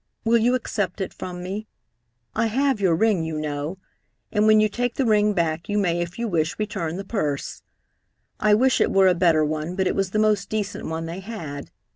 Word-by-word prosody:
Will 230 +1 +4
you 245 +3 +3
accept 205 -6 -2
it 190 - -3
from 180 -1 -7
me? 200 +4 -5 0.7
I 230 +1 +1
have 265 0 +1
your 180 -4 +3
ring, 200 -2 +2
you 160 -1 -3
know, 150 +3 -3 0.5
and 210 0 +2
when 215 0 +6
you 215 - +4
take 245 +3 -2
the 270 - +1
ring 210 -2 +3
back 165 0 -1
you 205 - 0
may, 175 -4 +1
if 175 +1 -5
you 235 0 -2
wish, 160 -5 0
return 195 -6 -3
the 195 - -4
purse. 150 -10 -3 0.8
I 210 -1 +4
wish 255 +3 +3
it - - +3
were 195 -1 +5
a 185 - +5
better 170 -3 +3
one, 155 +3 -3
but 190 0 0
it - - +1
was 195 -1 0
the 215 - -2
most 210 -3 +2
decent 210 -2 -3
one 160 +1 -3
they 170 +3 -5
had. 170 -9 -7
195 Hz, 215 wpm, -23 LUFS, 165-215 Hz, 0.8 s, when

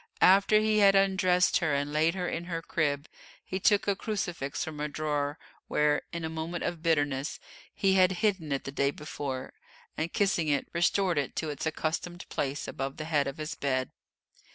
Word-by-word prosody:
After 200 +3 +6
he 215 0 +2
had 200 -1 +6
undressed 190 -2 +3
her 160 -5 +1
and 145 +1 -2
laid 160 +3 +2
her 180 -1 -2
in 170 0 -3
her 165 -2 -4
crib, 145 -3 -1 0.4
he 190 - -3
took 205 +1 +3
a 200 - +2
crucifix 175 -9 -3
from 155 -2 -6
a 150 - -1
drawer 150 -1 -2 0.3
where, 150 0 +2
in 170 -1 -4
a - - -1
moment 160 +2 -4
of 170 -2 -3
bitterness, 145 -4 0 0.3
he 195 -1 +2
had 185 0 +5
hidden 185 -8 0
it 140 - -1
the 135 - -5
day 140 0 +1
before, 140 -3 -5 0.4
and, 160 +2 -2
kissing 195 -6 +1
it, 145 -2 +1
restored 175 0 +2
it 140 - -3
to 155 -2 -2
its 145 +2 -3
accustomed 165 +3 -3
place 140 +1 -2
above 135 0 -4
the 155 - -5
head 150 -3 +1
of 135 - -5
his 155 0 -4
bed. 130 -2 -1
160 Hz, 190 wpm, -29 LUFS, 145-180 Hz, 0.4 s, After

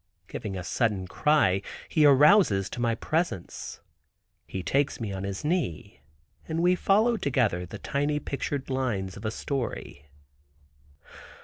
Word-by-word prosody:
Giving 95 -2 -5
a 90 - -5
sudden 105 -1 0
cry, 100 -5 +2 0.3
he 155 -2 +4
arouses 140 - +5
to 120 - -5
my 115 -1 +1
presence. 155 - -3 0.7
He 95 - -5
takes 140 +5 0
me 110 -4 -3
on 95 0 -4
his 100 +6 -5
knee, 150 - -2 0.5
and 165 +1 -1
we 180 +1 +5
follow 215 +6 +3
together 120 - 0
the - - -8
tiny 145 +1 -1
pictured 140 -1 -4
lines 110 -8 -1
of 105 - -9
a - - +1
story. 115 - -4
130 Hz, 135 wpm, -27 LUFS, 95-150 Hz, 0.7 s, arouses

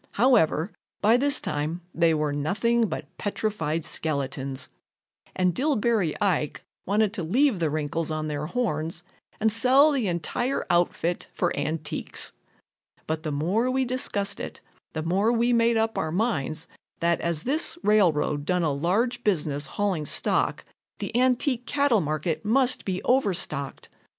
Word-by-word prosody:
However, 205 - +3 0.3
by 215 +3 +4
this 280 +3 +4
time 155 +4 -3
they 165 -1 +3
were 150 -1 0
nothing 220 +11 +1
but - - -5
petrified 165 -7 -2
skeletons, 140 -4 -3 0.7
and 180 -1 +2
Dillbery 225 - +1
Ike 175 -7 0 0.2
wanted 205 +1 +2
to 195 -6 -3
leave 235 - +2
the 165 -2 +1
wrinkles 155 +2 -2
on 155 0 -2
their 150 0 -3
horns 170 -7 -2 0.4
and 220 0 +3
sell 260 +7 +5
the 260 -7 0
entire 185 - -1
outfit 175 0 0
for 175 - 0
antiques. 150 +1 -2 0.7
But 155 0 -2
the 155 - -3
more 185 - +1
we 260 0 +1
discussed 210 -6 -2
it, - - -6 0.3
the 155 - -3
more 195 +7 +2
we 240 +1 +2
made 230 0 +3
up 225 0 0
our 160 - -2
minds 165 - -1 0.3
that 170 0 +1
as 170 -2 -1
this 305 +5 0
railroad 165 -8 +3
done 180 +2 +1
a 155 - +2
large 220 - 0
business 150 -7 0
hauling 190 -7 -1
stock, - - 0 0.3
the - - -5
antique 250 0 +2
cattle 280 -7 +2
market 155 +1 -2
must 255 +4 +2
be 185 -1 -2
overstocked. 180 - -1
185 Hz, 145 wpm, -26 LUFS, 155-235 Hz, 0.7 s, sell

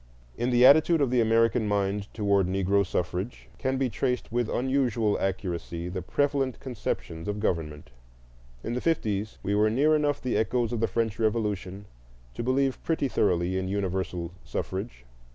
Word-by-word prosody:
In 120 +1 -1
the 125 0 +5
attitude 155 +4 +6
of 140 -4 +1
the 125 -1 +3
American 115 0 +3
mind 100 0 -1
toward 100 -3 +2
Negro 95 +1 +2
suffrage 90 +4 -3
can 130 0 0
be 135 0 +1
traced 125 0 -2
with 120 -1 0
unusual 125 -5 +1
accuracy 90 -3 -3
the 90 +1 -4
prevalent 140 - 0
conceptions 95 -9 -4
of 105 0 -2
government. 80 -8 -2 0.7
In 115 - -3
the 125 - -2
fifties 110 -10 -1
we 100 - 0
were 105 +1 +3
near 145 +7 +3
enough 145 -2 +1
the 125 -4 -1
echoes 115 +1 0
of 115 - -1
the 115 - +2
French 110 +1 -1
Revolution 105 -3 -1 0.5
to - - -5
believe 130 +2 +1
pretty 160 -4 0
thoroughly 90 -4 +1
in 95 - -3
universal 95 -3 -2
suffrage. 95 - -5
110 Hz, 160 wpm, -27 LUFS, 95-125 Hz, 0.7 s, attitude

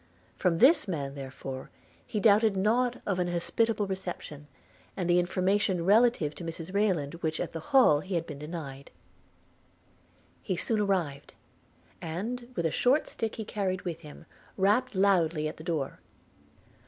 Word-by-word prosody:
From 175 -3 +1
this 265 - +6
man, 140 -7 -3
therefore, 135 -1 -7 0.4
he 215 - -2
doubted 210 -1 +4
not 240 +5 +1
of 190 -3 -1
an 180 - +1
hospitable 210 +5 0
reception, 175 -6 -6 0.5
and 180 - -1
the 175 0 +4
information 185 0 +1
relative 210 -7 +4
to 175 - -9
Mrs 165 +2 -6
Rayland 185 -9 +1
which 160 0 -2
at - - -3
the 165 - -4
Hall 255 - +6
he 185 +4 -4
had 165 -1 -1
been 150 -4 -8
denied. 150 -3 -7 1.5
He 185 - -2
soon 220 +5 +1
arrived; 180 -9 -1 0.7
and, 230 +10 -5
with 170 - -1
a 160 - +1
short 265 +5 +2
stick 225 -1 -3
he 220 - -5
carried 190 -3 -2
with 170 -3 -4
him, 150 -3 -12 0.3
rapped 210 +5 +2
loudly 175 -5 +2
at 155 - -7
the 155 - -10
door. 160 -5 -3
180 Hz, 155 wpm, -29 LUFS, 160-210 Hz, 1.5 s, this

